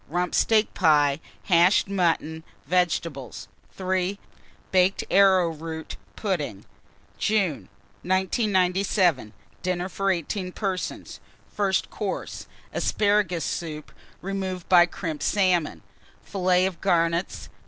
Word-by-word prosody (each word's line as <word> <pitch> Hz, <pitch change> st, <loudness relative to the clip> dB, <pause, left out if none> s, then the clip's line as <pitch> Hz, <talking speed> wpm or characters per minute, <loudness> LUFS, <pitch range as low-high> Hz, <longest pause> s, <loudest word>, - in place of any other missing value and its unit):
Rump 180 Hz, 0 st, -2 dB
steak 220 Hz, -1 st, +2 dB
pie, 150 Hz, -5 st, +3 dB, 0.2 s
hashed 175 Hz, +2 st, +4 dB
mutton, 165 Hz, -4 st, 0 dB, 0.2 s
vegetables. 165 Hz, -, -1 dB, 0.3 s
3. 185 Hz, +1 st, -1 dB, 0.5 s
Baked 185 Hz, +1 st, +3 dB
arrowroot 165 Hz, -5 st, +2 dB, 0.2 s
pudding. 155 Hz, -, -3 dB, 0.5 s
JUNE. 200 Hz, -8 st, 0 dB, 0.3 s
1997. 185 Hz, -, +1 dB, 0.3 s
DINNER 180 Hz, 0 st, -2 dB
FOR 195 Hz, +1 st, -1 dB
18 180 Hz, +1 st, -2 dB
PERSONS. 190 Hz, -3 st, -4 dB, 0.4 s
First 195 Hz, -2 st, 0 dB
Course. 205 Hz, -3 st, -5 dB, 0.3 s
Asparagus 205 Hz, -6 st, +1 dB
Soup, 155 Hz, -3 st, -5 dB, 0.3 s
removed 190 Hz, -2 st, -4 dB
by 175 Hz, -1 st, +6 dB
Crimped 165 Hz, -4 st, -5 dB
Salmon. 175 Hz, -, +1 dB, 0.4 s
Fillets 185 Hz, -1 st, +1 dB
of 180 Hz, -4 st, -7 dB
Garnets. 170 Hz, -1 st, 0 dB
180 Hz, 90 wpm, -25 LUFS, 165-195 Hz, 0.5 s, by